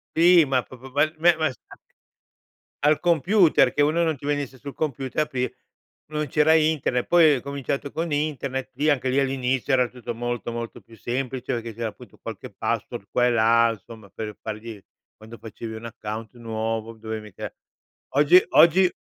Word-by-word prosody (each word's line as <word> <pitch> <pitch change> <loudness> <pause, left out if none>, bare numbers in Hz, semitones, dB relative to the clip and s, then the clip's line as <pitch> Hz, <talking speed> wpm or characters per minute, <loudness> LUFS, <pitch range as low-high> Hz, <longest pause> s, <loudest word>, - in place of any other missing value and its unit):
Sì, 170 0 +6
ma 135 -2 +1
pro 130 - -13
probabilmen 155 +6 +2
ma 155 -3 +1
s 130 - -15 1.3
Al 150 +1 +4
computer, 175 +1 +4
che 145 - +1
uno 155 +4 +3
non 160 -2 +1
ti 140 - -11
venisse 145 -3 -2
sul 140 +1 -8
computer, 135 -2 -2
aprir 125 -4 -3 0.6
non 150 0 -2
c'era 150 +3 +3
Internet, 155 -6 +1
poi 165 -4 +5
ha 130 - -4
cominciato 140 0 -4
con 165 0 -3
Internet, 140 -3 -2
lì 150 +2 +1
anche 130 -3 +1
lì 135 +2 +2
all'inizio 135 0 0
era 125 -1 +4
tutto 120 -2 -7
molto, 120 0 -3
molto 115 0 -6
più 115 - -18
semplice, 130 +3 -3
perché 115 -1 -4
c'era 115 0 -3
appunto - - -15
qualche - - -8
password - - -3
qua 125 - +2
e - - +3
là 115 0 +4
insomma 110 0 -11
per 105 +2 -6
fargli 110 -1 -7 0.3
quando 110 +2 -12
facevi 110 0 -8
un 110 +1 -8
account 110 -1 -7
nuovo, 115 -1 -3
dovevi 110 -1 -6
mica 105 -3 -8 0.6
Oggi 150 +6 +6
oggi 180 +2 +6
130 Hz, 170 wpm, -24 LUFS, 115-150 Hz, 1.3 s, Sì